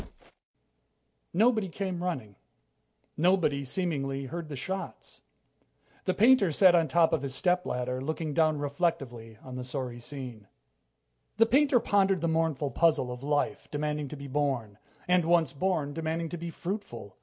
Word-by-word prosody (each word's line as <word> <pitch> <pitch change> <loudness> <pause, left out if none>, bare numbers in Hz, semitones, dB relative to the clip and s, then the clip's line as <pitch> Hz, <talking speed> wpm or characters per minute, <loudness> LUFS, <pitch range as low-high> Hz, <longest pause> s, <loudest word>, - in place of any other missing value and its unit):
Nobody 220 +1 +2
came 185 0 -4
running. 135 - -4 0.8
Nobody, 165 -5 +2
seemingly, 135 -3 -2
heard 165 +4 -6
the 145 - -5
shots. 190 +8 -6 0.8
The 185 - +1
painter 225 -4 +5
sat 185 +3 +6
on 170 -2 +4
the - - -12
top 170 -1 +4
of 160 - +1
his 135 -1 -4
stepladder, 130 -9 0
looking 155 +2 -3
down 155 0 +3
reflectively 135 -7 -2
on 130 -1 -8
the 125 - -4
sorry 125 -1 -5
scene. 120 -5 -8 0.9
The 225 - +6
painter 270 +1 +4
pondered 195 -4 +2
the 170 - +1
mournful 160 -3 0
puzzle 155 -3 +2
of 125 0 -7
life 145 0 -1
demanding 150 0 -2
to 150 - -8
be 140 - -8
born 130 -7 -2 0.3
and, 180 -1 +4
once 165 -2 +2
born, 155 -3 -1
demanding 165 +1 -2
to 175 - -5
be 170 +1 -5
fruitful 165 - -6
155 Hz, 150 wpm, -29 LUFS, 135-180 Hz, 0.9 s, sat